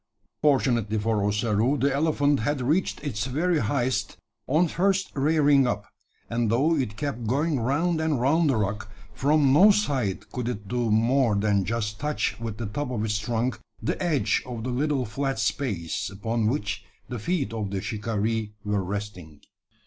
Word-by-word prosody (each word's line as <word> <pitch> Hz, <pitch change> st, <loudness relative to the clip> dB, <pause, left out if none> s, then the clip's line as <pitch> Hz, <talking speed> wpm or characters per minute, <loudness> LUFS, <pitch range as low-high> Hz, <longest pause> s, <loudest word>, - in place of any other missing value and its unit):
Fortunately 120 Hz, -7 st, +2 dB
for 105 Hz, -1 st, 0 dB
Ossaroo, 110 Hz, +5 st, +1 dB
the 140 Hz, 0 st, +1 dB
elephant 145 Hz, -1 st, +2 dB
had 140 Hz, +6 st, -1 dB
reached 150 Hz, +6 st, 0 dB
its 110 Hz, -8 st, -2 dB
very 160 Hz, +5 st, +1 dB
highest 125 Hz, +3 st, -1 dB, 0.3 s
on 160 Hz, +6 st, +3 dB
first 190 Hz, +3 st, +1 dB
rearing 145 Hz, -2 st, +3 dB
up; 105 Hz, -4 st, -2 dB, 0.4 s
and 115 Hz, -1 st, 0 dB
though 140 Hz, +9 st, +3 dB
it 125 Hz, -8 st, -2 dB
kept 125 Hz, -5 st, -3 dB
going 145 Hz, +4 st, +1 dB
round 160 Hz, +7 st, +1 dB
and 155 Hz, -5 st, +1 dB
round 150 Hz, +5 st, +3 dB
the 135 Hz, -, +2 dB
rock, 105 Hz, 0 st, -2 dB, 0.2 s
from 145 Hz, -1 st, +3 dB
no 190 Hz, +9 st, +8 dB
side 140 Hz, -, 0 dB
could 125 Hz, -2 st, -3 dB
it 105 Hz, -4 st, -5 dB
do 120 Hz, +1 st, -1 dB
more 115 Hz, +1 st, +3 dB
than 100 Hz, -1 st, +1 dB
just 105 Hz, 0 st, -2 dB
touch 150 Hz, -3 st, -1 dB
with 115 Hz, -2 st, -5 dB
the 115 Hz, -, -4 dB
top 125 Hz, +7 st, -3 dB
of 110 Hz, -4 st, -2 dB
its 105 Hz, -1 st, 0 dB
trunk 115 Hz, +3 st, -1 dB, 0.2 s
the -, -, -2 dB
edge 145 Hz, -, +1 dB
of 120 Hz, -3 st, -5 dB
the 125 Hz, -, -2 dB
little 135 Hz, 0 st, 0 dB
flat 135 Hz, +3 st, -2 dB
space, 105 Hz, -, -2 dB
upon 110 Hz, +3 st, -1 dB
which 105 Hz, -5 st, -2 dB, 0.2 s
the 120 Hz, -3 st, -5 dB
feet 140 Hz, -, -1 dB
of 105 Hz, -3 st, -3 dB
the 100 Hz, 0 st, -2 dB
shikaree 110 Hz, +1 st, -2 dB
were 105 Hz, -1 st, 0 dB
resting. 90 Hz, -6 st, -6 dB
120 Hz, 170 wpm, -26 LUFS, 105-145 Hz, 0.4 s, no